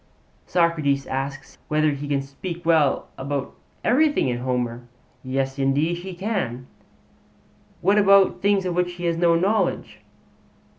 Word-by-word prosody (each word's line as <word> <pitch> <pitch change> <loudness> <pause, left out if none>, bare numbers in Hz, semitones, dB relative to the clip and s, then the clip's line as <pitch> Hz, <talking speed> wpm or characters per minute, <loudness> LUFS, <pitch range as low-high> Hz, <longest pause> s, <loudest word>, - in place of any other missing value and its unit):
Socrates 155 -6 +1
asks 135 0 -5
whether 155 0 +2
he 145 0 -5
can 140 -1 0
speak 170 +5 -7
well 160 -4 +2
about 135 - -3 0.3
everything 290 - +3
in 120 -1 -2
Homer. 125 -1 -2 0.4
'Yes, 135 +1 -2
indeed 145 +5 +1
he 185 0 -7
can.' 175 - -3 1.2
'What 200 +3 +4
about 200 -1 +5
things 200 -1 +2
of 180 - -1
which 180 0 0
he 175 0 -6
has 170 -1 0
no 170 -1 +3
knowledge?' 195 +6 0
155 Hz, 135 wpm, -23 LUFS, 135-180 Hz, 1.2 s, about